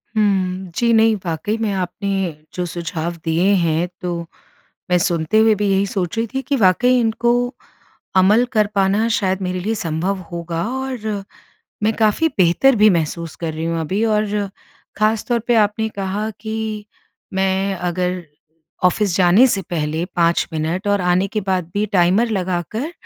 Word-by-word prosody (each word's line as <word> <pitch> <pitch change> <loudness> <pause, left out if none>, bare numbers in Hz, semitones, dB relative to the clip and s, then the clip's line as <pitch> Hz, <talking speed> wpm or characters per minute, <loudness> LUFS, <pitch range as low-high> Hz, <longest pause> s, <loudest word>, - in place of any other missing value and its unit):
हुँ। 190 -3 0
जी 235 -1 +2
नहीं, 225 0 +4
वाक़ई 170 +6 -2
में 215 -2 0
आपने 190 -1 -2 0.2
जो 180 - -2
सुझाव 170 0 -4
दिए 165 +4 +2
हैं 165 +1 +1
तो 175 -2 -2 0.7
मैं 180 - +4
सुनते 170 +2 +1
हुए 220 0 +5
भी 205 0 -1
यही 195 +1 +2
सोच 190 0 -3
रही 230 +1 0
थी 265 - -1
कि 280 +2 -1
वाक़ई 245 +5 +4
इनको 235 +1 +1 0.9
अमल 210 +6 +5
कर 215 -2 +3
पाना 200 +3 +2
शायद 195 -4 0
मेरे 185 0 -2
लिए 220 +5 -1
संभव 180 +1 -2
होगा, 170 -1 -3 0.2
और 220 -6 -4 0.6
मैं 215 +1 +3
काफ़ी 220 +9 +2
बेहतर 190 +9 +4
भी 215 0 +6
महसूस 165 -1 -2
कर 165 -2 -4
रही 160 +1 -4
हूँ 165 0 -1
अभी। 190 +7 -1
और 210 -2 0 0.5
ख़ास 215 +1 +2
तौर 240 -1 +2
पे 240 - +4
आपने 215 +1 +2
कहा 200 +1 -3
कि 220 -1 -4 0.5
मैं 190 +1 +1
अगर 180 +1 -2 0.6
ऑफ़िस 185 0 +2
जाने 185 +7 +6
से 195 -5 0
पहले 160 0 -1
5 170 0 +2
मिनट, 165 +6 -2
और 205 0 +2
आने 180 +1 +2
के 215 +2 -2
बाद 185 -3 -2
भी 205 +1 +1
टाइमर 185 +7 +3
लगाकर 190 - -2
195 Hz, 160 wpm, -19 LUFS, 175-215 Hz, 0.9 s, भी